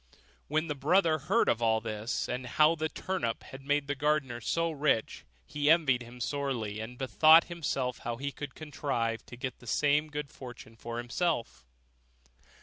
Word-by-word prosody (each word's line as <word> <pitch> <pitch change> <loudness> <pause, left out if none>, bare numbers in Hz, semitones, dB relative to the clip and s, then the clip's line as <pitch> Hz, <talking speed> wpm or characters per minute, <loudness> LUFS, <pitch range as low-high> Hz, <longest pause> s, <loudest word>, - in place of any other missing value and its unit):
When 155 +2 +1
the 155 - -2
brother 155 +3 +3
heard 195 +11 +2
of 115 - +2
all 110 -1 +3
this, 110 +1 -3
and 125 0 -4
how 150 +5 +5
a 160 -1 -2
turnip 175 -13 -3
had 135 - -10
made 145 +1 0
the 140 - -1
gardener 140 -4 0
so 165 +8 0
rich, 145 -7 0 0.2
he 145 - 0
envied 150 -7 +4
him 120 +1 -11
sorely, 120 -5 -2
and 115 +3 -7
bethought 155 +5 +6
himself 140 -7 -3
how 120 0 -4
he 140 +3 -3
could 145 -1 -8
contrive 135 -7 -2
to 120 - -10
get 130 0 -5
the 125 - -15
same 150 +5 +2
good 150 -1 -5
fortune 120 -3 -11
for 115 +1 -6
himself. 120 - -2
140 Hz, 170 wpm, -30 LUFS, 120-155 Hz, 0.2 s, bethought